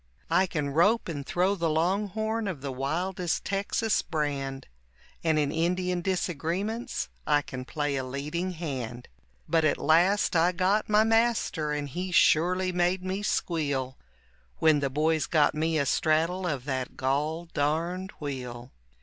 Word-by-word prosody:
I 190 - +4
can 150 -5 -2
rope 205 +10 +3
and 145 -5 -4
throw 180 +7 +1
the 170 -4 -1
longhorn 205 +7 0
of 170 -8 -4
the 140 -1 -4
wildest 170 +7 -2
Texas 200 +2 0
brand, 140 -4 -3 0.6
And 160 -2 +2
in 145 -2 +1
Indian 180 +2 0
disagreements 190 - -2 0.2
I 145 -1 +3
can 130 -1 -7
play 145 0 -2
a 130 - -2
leading 150 +8 -3
hand, 130 -8 -5 0.4
But 165 -1 +2
at 155 - +2
last 175 +6 +3
I 170 +2 +4
got 190 +5 +1
my 210 +1 +5
master 225 -9 +1
and 145 -1 -2
he 180 +7 -4
surely 180 +3 +3
made 180 +1 +1
me 190 +2 -2
squeal 145 -9 -1 0.6
When 155 -2 +4
the 140 -1 0
boys 155 +2 +1
got 150 -3 +3
me 160 +1 0
a 140 - +1
straddle 165 +6 +1
of 140 -6 -3
that 130 -3 -3
gol 150 +6 -1
darned 170 +6 -1
wheel. 125 -4 -6
165 Hz, 150 wpm, -28 LUFS, 145-185 Hz, 0.6 s, my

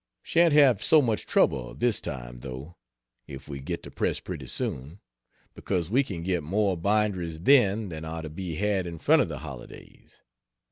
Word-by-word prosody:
Shan't 170 0 +3
have 140 -8 +5
so 155 - +6
much 115 -7 0
trouble, 60 -3 +1
this 120 -2 0
time, - - -7
though, 65 +7 -8 0.5
if 70 - -9
we 70 -2 -6
get 70 - -5
to - - -10
press - - -1
pretty - - -7
soon, 70 +9 -4 0.5
because 90 -2 -3
we 135 +4 +4
can 90 -9 -6
get 90 -1 0
more 95 +5 0
binderies 90 -3 0
then 110 -5 +4
than 80 -2 -7
are 80 0 -5
to 80 - -6
be 85 0 -5
had 100 -1 0
in 85 -1 -6
front 155 - +4
of 110 - -1
the 75 - -5
holidays. 70 -4 -12
90 Hz, 180 wpm, -27 LUFS, 80-105 Hz, 0.5 s, so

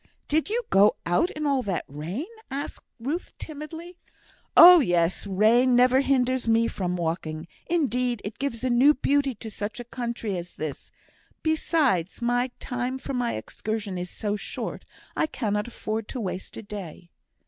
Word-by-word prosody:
"Did 315 +5 +1
you 475 +3 0
go 200 +2 +6
out 175 - +2
in 305 0 -4
all 275 -2 +2
that 195 -7 -2
rain?" 165 - -5 0.2
asked 280 +2 -5 0.2
Ruth, 290 +10 -4
timidly. 320 +3 -8 0.6
"Oh, 355 0 +11
yes. 175 - +1
Rain 230 +6 +4
never 255 +2 +5
hinders 260 -2 +1
me 230 0 +4
from 180 -4 -2
walking. 160 -1 -3 0.2
Indeed, 250 -8 0
it 210 +2 -6
gives 270 -4 -3
a 255 - +1
new 270 +5 +6
beauty 280 -1 +1
to 220 +1 -8
such 205 +3 -5
a - - -5
country 235 -4 -4
as 175 0 -8
this. 150 -3 -6 0.5
Besides, 305 - +1
my 245 +1 +1
time 250 +1 -3
for 265 - -6
my 245 -2 0
excursion 205 - -4
is 180 0 -5
so 205 +1 -3
short, 205 - -5 0.3
I - - +1
cannot 210 -6 -2
afford 220 -2 -4
to 260 - -5
waste 190 -3 -5
a - - -7
day." 185 -4 -8
240 Hz, 160 wpm, -26 LUFS, 200-275 Hz, 0.6 s, Oh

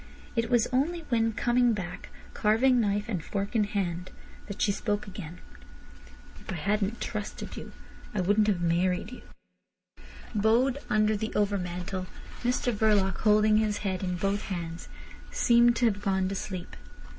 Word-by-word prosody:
It 230 -1 0
was 240 -3 +4
only 325 +7 +1
when 225 -2 +2
coming 240 +1 +3
back, 180 -3 -6 0.2
carving 240 +4 +3
knife 205 -1 0
and 185 -8 -3
fork 200 +4 -3
in 215 -2 +3
hand, 185 -3 -2 0.4
that 200 -1 -7
she 205 - +3
spoke 205 0 -2
again. 180 -4 -8 1.0
"If - - -8
I - - -3
hadn't 205 +6 -1
trusted 210 -2 -5
you - - -8 0.4
I 210 - -3
wouldn't 205 +3 +3
have 190 -4 +1
married 180 +4 +1
you." 250 - -9 1.1
Bowed 235 +6 +3
under 215 0 +3
the 220 +1 -3
overmantel, 185 -2 -1 0.4
Mr 245 0 +1
Verloc, 205 -4 +2
holding 215 0 +4
his 215 -1 +1
head 190 -2 -1
in 180 -1 -1
both 195 +3 0
hands, 170 -3 -5 0.4
seemed 235 0 +4
to 240 - +2
have 205 -3 +1
gone 190 -2 +1
to - - -3
sleep. 185 -2 -5
205 Hz, 155 wpm, -28 LUFS, 190-225 Hz, 1.1 s, was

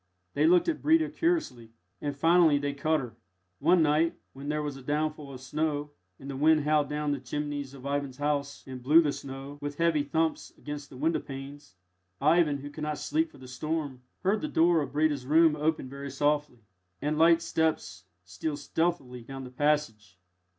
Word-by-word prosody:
They 150 +2 +3
looked 175 +1 +5
at 330 -2 -1
Breda 320 +1 +3
curiously, 130 - -1 0.3
and 145 -1 -3
finally 165 0 +5
they 145 0 -2
cut 155 +2 +1
her. 115 -3 -9 0.4
One 165 +3 +4
night, 155 +2 +2 0.2
when 140 +2 -7
there 150 0 -1
was 145 -2 -4
a 135 - -10
downfall 150 +1 -2
of 130 -1 -9
snow, 150 +2 -2 0.3
and 135 - -11
the 140 - -5
wind 155 +2 +4
howled 150 -1 +2
down 150 0 -1
the 145 - -1
chimneys 145 +1 -4
of 135 0 -12
Ivan's 140 -2 -2
house 145 -1 -2
and 130 -1 -8
blew 155 +6 +6
the 145 - +1
snow, 135 +1 -8
with 145 0 -5
heavy 165 -3 +2
thumps 160 +2 -1
against 145 -1 -7
the 130 - -12
window 160 +4 +1
panes, 135 -6 -9 0.4
Ivan, 155 0 +3
who 145 +1 -8
could 150 - -9
not 150 -1 -2
sleep 320 +1 0
for - - -17
the 130 - -12
storm, 145 0 -3 0.2
heard 195 +3 +2
the 305 - -2
door 170 - +3
of 135 -2 -5
Breda's 145 -4 +1
room 160 +1 +5
open 150 -2 -1
very 140 +1 -7
softly, 145 -3 -1 0.4
and 150 +1 -1
light 165 0 +5
steps 155 - -1 0.2
steal 120 - -4
stealthily 145 -5 -2
down 135 +3 -8
the 125 - -9
passage. 125 -9 -1
145 Hz, 190 wpm, -28 LUFS, 135-160 Hz, 0.4 s, blew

